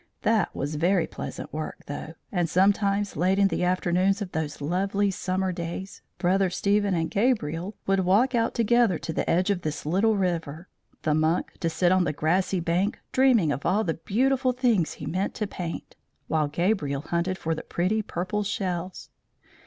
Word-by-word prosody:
That 220 -4 +2
was 145 +2 -3
very 175 +2 +2
pleasant - - -7
work, 155 0 -5
though, 150 +3 -6 0.2
and 175 -4 0
sometimes, 200 +2 +2
late 185 +5 +2
in 200 -1 +4
the 175 - -1
afternoons 185 +2 +2
of 200 -4 -5
those 155 -2 -3
lovely 195 +6 0
summer 185 0 -1
days, 175 +2 -6 0.2
Brother 190 +1 +2
Stephen 200 +1 +1
and 165 -1 -1
Gabriel 200 - 0
would 195 0 +2
walk 200 +8 +3
out 230 -1 +1
together 235 -4 +3
to 160 - -5
the - - -1
edge 185 +4 +2
of 185 -3 -1
this 155 -2 -4
little 195 +8 +2
river; 170 -3 -2 0.4
the 155 - +2
monk 155 +3 +1
to 165 - 0
sit 175 +2 +2
on 185 -1 +4
the 175 - -1
grassy 180 +5 +1
bank 175 +5 0
dreaming 245 - +4
of 140 - -3
all 200 +5 +2
the 165 - 0
beautiful 255 - +1
things 235 -9 +1
he - - -8
meant 190 +4 -2
to 215 - -1
paint, 175 -4 -6 0.3
while 155 -2 +1
Gabriel 150 -3 0
hunted 170 +4 -1
for 165 -2 -1
the 160 - -4
pretty 190 +6 0
purple 190 +1 -3
shells. 185 -3 -3
185 Hz, 175 wpm, -26 LUFS, 165-200 Hz, 0.4 s, in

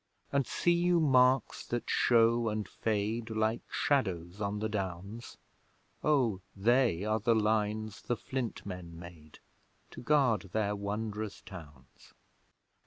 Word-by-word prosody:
And 140 -1 +1
see 175 - +1
you 175 0 +3
marks 130 -3 +3
that 120 0 -3
show 115 -1 +3
and 105 -1 -3
fade, 110 +2 -2
Like 110 +1 0
shadows 95 - -1
on 100 0 -1
the 110 +1 -1
Downs? 100 +2 -5 0.7
O 125 -10 +2 0.2
they 115 -3 +3
are 110 +1 +1
the 115 +2 +2
lines 110 -1 0
the 120 - -2
Flint 130 -2 -4
Men 90 -4 -7
made, 85 -3 -12 0.5
To - - -9
guard 125 -7 +2
their 105 -1 0
wondrous 105 +1 -4
towns! 75 - -13
110 Hz, 125 wpm, -31 LUFS, 100-120 Hz, 0.7 s, you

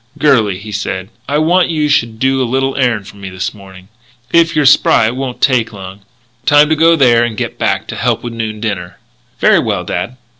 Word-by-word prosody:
"Girlie," 115 -11 +2
he 105 +2 -10
said, 100 -2 -4 0.2
"I 145 - +1
want 175 +4 +2
you 155 -2 0
should 115 -6 0
do 130 +2 +1
a - - +2
little 135 +2 -1
errand 120 -7 0
for - - -13
me 100 -1 -8
this 95 +1 -4
morning. 95 -2 -15 0.5
If 170 -1 +3
you're 150 -2 +2
spry 135 -4 +4
it 115 +3 -1
won't 130 -2 -5
take 125 -4 +2
long 95 -1 -10 0.5
time 145 +1 +5
to 160 - +2
go 165 +2 +4
there 120 -6 +4
and 115 -2 -3
get - - -4
back - - 0
to - - -5
help - - -1
with 120 -1 -6
noon 110 -2 -5
dinner." 100 -5 -4 0.4
"Very - - +4
well, - - -2
dad." 125 - -4
120 Hz, 215 wpm, -14 LUFS, 105-140 Hz, 0.5 s, time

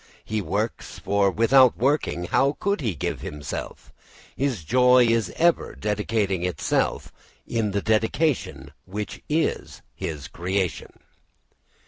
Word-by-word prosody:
He 110 -1 -2
works, 105 +4 -3
for 100 0 +1
without 125 +5 +5
working 135 - 0
how 135 +11 +1
could 200 -3 0
he 110 -9 -1
give 70 - -3
himself. 75 0 -7 0.4
His 130 - -1
joy 125 +5 +5
is 115 -2 +1
ever 170 0 +2
dedicating 105 -2 -1
itself 90 -1 -1 0.3
in 115 -3 -1
the 100 0 -2
dedication 110 - 0 0.2
which 105 +2 -5
is 155 +2 -1
his 75 -3 -5
creation. 90 +1 -2
110 Hz, 115 wpm, -24 LUFS, 95-125 Hz, 0.4 s, without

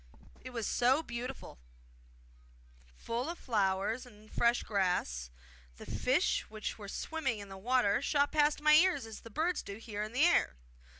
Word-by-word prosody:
It 255 - -7
was 230 -3 -4
so 260 +9 +2
beautiful, 245 - -6 1.4
full 240 +6 -3
of 345 - -5
flowers 205 +1 0
and 215 -3 -16
fresh 235 +1 +2
grass; 180 - -1 0.5
the - - -10
fishes 265 +8 +1
which 215 0 -5
were 205 - -8
swimming 275 -2 -2
in 200 -1 -9
the 195 - -8
water 245 0 +2
shot 285 0 +2
past 300 0 +2
my 305 0 +6
ears 315 -5 +5
as 225 -1 -9
the 230 - -12
birds 325 +9 0
do 200 - -7
here 215 -2 -6
in 215 +1 -4
the 260 +5 +3
air. 345 - +3
240 Hz, 165 wpm, -32 LUFS, 210-285 Hz, 1.4 s, my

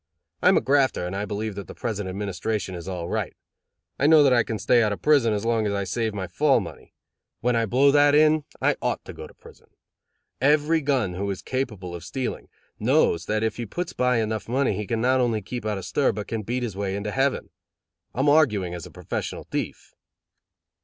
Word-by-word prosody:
I - - +5
am - - +5
a - - +3
grafter, 135 -9 +2
and 90 +2 -4
I 100 +1 -2
believe 105 +1 -3
that 100 0 -7
the - - -10
present 105 -5 -3
administration 100 0 -3
is 85 0 -7
all 90 -3 -4
right. - - -3 0.6
I 140 - +3
know 155 -1 +7
that 135 -2 +5
I 120 - +5
can 110 -1 -3
stay 120 +2 +3
out 110 -2 +2
of 100 - -5
prison 140 -7 +4
as 105 +1 -2
long 115 -2 +1
as 100 - -1
I 100 - -1
save 110 +4 -1
my 95 -2 -3
fall 135 - +2
money. 95 -6 -10 0.5
When 125 +1 +1
I 115 -1 +1
blow 135 +6 +4
that 145 0 +5
in 155 0 +4 0.2
I - - +1
ought - - -2
to - - -8
go - - -9
to - - -18
prison. - - -17 0.7
Every 150 +3 +3
gun 130 -10 0
who 100 +3 -3
is 95 - -4
capable 105 -9 -4
of 85 -1 -7
stealing, 130 +7 -4 0.3
knows 110 - +2
that 110 +1 0
if 110 - -1
he 120 -2 -4
puts 175 - -4
by 125 -1 +2
enough 110 0 -2
money 130 -1 +1
he 105 +1 -4
can 115 -1 -1
not 130 +2 +3
only 120 -3 +1
keep 110 +3 -6
out 105 -2 -1
of 95 - -6
stir 145 - +1
but 105 -1 -6
can 115 -1 -3
beat 120 +4 -3
his 110 -6 -4
way 100 -1 -2
into 105 +1 -3
heaven. 135 +3 0 0.6
I'm 135 +4 +1
arguing 110 - +3
as 85 -3 -7
a - - -13
professional - - -5
thief." - - -4
110 Hz, 225 wpm, -24 LUFS, 100-135 Hz, 0.7 s, know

